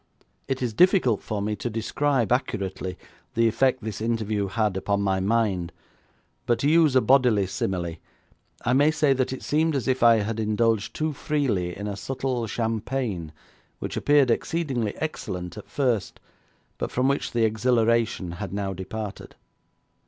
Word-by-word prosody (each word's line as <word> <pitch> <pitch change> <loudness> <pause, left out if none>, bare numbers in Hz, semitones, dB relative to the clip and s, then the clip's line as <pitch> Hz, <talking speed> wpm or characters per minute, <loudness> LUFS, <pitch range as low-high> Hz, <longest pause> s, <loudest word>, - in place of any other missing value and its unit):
It 130 -1 -2
is 120 -3 -1
difficult 150 - +4
for 105 -2 -3
me 105 +1 -1
to 120 - -3
describe 120 +3 0
accurately 100 -7 -2 0.4
the 115 0 +4
effect 130 +2 +1
this 110 -1 -5
interview 110 -3 -1
had 105 0 0
upon 100 +1 0
my 95 -1 +1
mind, 95 -4 0 0.8
but 120 - +3
to 140 - +2
use 155 -3 +4
a 130 - +6
bodily 125 -7 +4
simile, 90 -2 -3 0.7
I 125 - +2
may 145 +3 +5
say 150 -3 +3
that 130 -1 0
it 130 - -6
seemed 155 +1 +1
as 130 -5 -2
if 130 0 +1
I 115 -1 +7
had 110 +2 -3
indulged 110 0 +1
too 155 0 -1
freely 120 -14 -1
in 100 - -5
a 100 -1 -3
subtle 125 +2 -3
champagne 110 - -2 0.5
which - - -5
appeared 145 -4 +4
exceedingly 130 -6 -1
excellent 90 - -4
at 105 - -10
first, 120 -8 -1 0.6
but - - -2
from 125 +1 +1
which 140 +1 0
the 115 -1 +2
exhilaration 110 -3 +1
had 95 +3 -6
now 100 -1 -2
departed. 100 +3 -7
115 Hz, 160 wpm, -25 LUFS, 100-130 Hz, 0.8 s, I